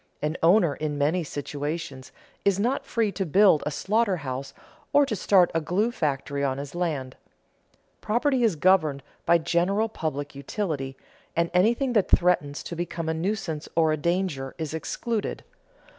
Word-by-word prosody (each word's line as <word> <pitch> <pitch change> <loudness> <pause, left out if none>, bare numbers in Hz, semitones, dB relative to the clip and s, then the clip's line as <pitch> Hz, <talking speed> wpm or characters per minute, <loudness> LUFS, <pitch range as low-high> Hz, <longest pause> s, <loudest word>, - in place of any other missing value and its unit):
An 150 +2 -2
owner 170 -2 +5
in 150 0 -3
many 155 +5 +1
situations 145 -1 -5 0.3
is 200 -1 +2
not 245 +6 0
free 225 -3 0
to 195 +1 -2
build 190 -1 +5
a - - +2
slaughter 200 +6 +1
house 135 -2 -5 0.4
or 290 0 +6
to 245 -6 -2
start 185 -2 +4
a 165 - +1
glue 200 +9 0
factory 140 - -2
on 135 -1 0
his 140 0 -6
land. 155 -7 -2 0.9
Property 250 +4 +1
is 220 -7 +3
governed 155 -4 +3 0.2
by 170 - +6
general 180 +6 +1
public 150 -8 -4
utility, 140 -2 -4 0.4
and 170 0 +1
anything 235 +8 +2
that 210 -5 +2
threatens 160 -5 +2
to 170 - -6
become 165 -1 -3
a - - +1
nuisance 165 -3 -3
or 160 -1 +4
a - - +2
danger 170 -4 -1
is 160 -2 -4
excluded. 215 +7 -3
170 Hz, 160 wpm, -26 LUFS, 145-200 Hz, 0.9 s, or